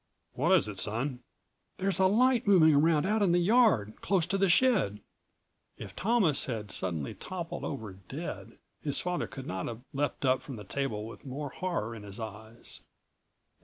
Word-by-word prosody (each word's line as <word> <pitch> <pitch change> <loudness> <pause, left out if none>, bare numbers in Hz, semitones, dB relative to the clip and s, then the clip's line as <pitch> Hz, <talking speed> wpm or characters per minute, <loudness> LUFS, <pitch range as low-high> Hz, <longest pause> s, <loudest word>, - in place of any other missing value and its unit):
"What 155 +8 +1
is 185 - +4
it, 100 -3 -6
son?" 120 +7 -2 0.6
"There's 190 0 0
a 190 - +6
light 240 +3 +3
moving 165 -6 +7
around 155 +2 +4
out 215 +2 +1
in 185 -4 +4
the - - +4
yard, 175 - +3
close 185 -5 +2
to 195 +2 -1
the 195 -1 +3
shed." 180 - +3 0.8
If - - -9
Thomas 200 - +2
had 110 -5 -4
suddenly 85 -6 -2
toppled 175 -3 -6
over 110 -9 -5
dead 95 -1 -7 0.2
his 145 -2 -1
father 180 0 -1
could 135 -2 -8
not 95 0 -3
have 115 0 -6
leapt 145 0 -1
up 130 -1 +3
from 135 - -8
the 105 - -8
table 110 -1 -3
with 115 - -10
more 140 +1 -5
horror 150 -8 -3
in 110 - -8
his 100 0 -8
eyes. 110 +1 -7
140 Hz, 175 wpm, -30 LUFS, -, 0.8 s, moving